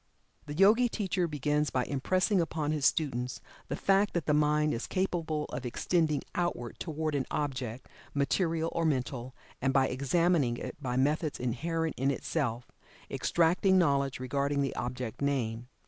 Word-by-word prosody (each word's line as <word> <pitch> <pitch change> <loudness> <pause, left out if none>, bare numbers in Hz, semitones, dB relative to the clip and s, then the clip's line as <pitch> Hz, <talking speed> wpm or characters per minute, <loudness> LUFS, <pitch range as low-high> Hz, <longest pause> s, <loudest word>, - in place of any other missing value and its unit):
The 145 - -5
Yogi 215 +7 +5
teacher 190 -5 -1
begins 150 0 0
by 125 -1 0
impressing 185 - +1
upon 155 -2 -1
his 150 -3 +3
students 125 -5 -1 0.3
the 140 - -2
fact 195 +5 +2
that 170 - 0
the 150 - +2
mind 150 0 +3
is 115 - -3
capable 165 -5 -1
of 130 - -5
extending 155 +4 0
outward 175 -9 -2
toward 155 -2 -2
an 140 -2 -1
object, 130 -4 -3 0.3
material 165 +3 +1
or 170 - 0
mental, 130 -4 -1 0.3
and 135 +1 +2
by 135 -1 +3
examining 140 -1 +2
it - - -6
by 125 -2 -2
methods 150 +3 +1
inherent 160 +7 -1
in 135 +1 +2
itself, 125 -4 -2 0.4
extracting 180 +3 +3
knowledge 140 -6 +2
regarding 140 +2 0
the 135 - -2
object 125 -1 -4
named. 125 -4 -1
145 Hz, 150 wpm, -30 LUFS, 130-165 Hz, 0.4 s, Yogi